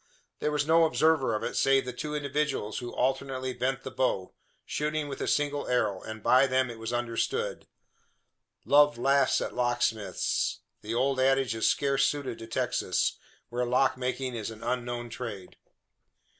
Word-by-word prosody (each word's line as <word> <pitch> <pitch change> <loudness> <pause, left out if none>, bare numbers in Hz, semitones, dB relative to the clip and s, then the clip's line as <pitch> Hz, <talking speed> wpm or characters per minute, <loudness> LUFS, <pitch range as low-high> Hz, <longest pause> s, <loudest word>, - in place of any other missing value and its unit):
There 150 - 0
was 150 -1 0
no 165 +1 +5
observer 155 -7 +2
of 105 - -3
it - - -3
save 135 -1 +3
the 125 - -4
two 150 +4 -4
individuals 145 -7 -1
who 120 -1 -6
alternately 130 0 -1
bent 130 +2 -2
the 130 - -6
bow, 95 -8 -1 0.3
shooting 150 0 -2
with 140 - -6
a - - -2
single 145 -1 0
arrow; 105 -6 +1
and 110 -1 -8
by 130 +2 +5
them 130 -1 +1
it 115 - -10
was 115 +1 -4
understood. 120 - -2 1.0
"Love 145 -1 +5
laughs 135 +2 +3
at - - -3
locksmiths." 120 -4 0 0.2
The 110 +2 -4
old 135 +2 +1
adage 135 -1 +3
is 110 - +1
scarce 140 -1 +2
suited 140 -5 -3
to 115 - -8
Texas, 115 - 0 0.3
where 120 +1 -1
lock 125 +2 +2
making 130 0 -3
is 110 -3 -4
an 110 0 -10
unknown 120 -1 -3
trade. 105 -6 -7
130 Hz, 165 wpm, -28 LUFS, 120-140 Hz, 1.0 s, no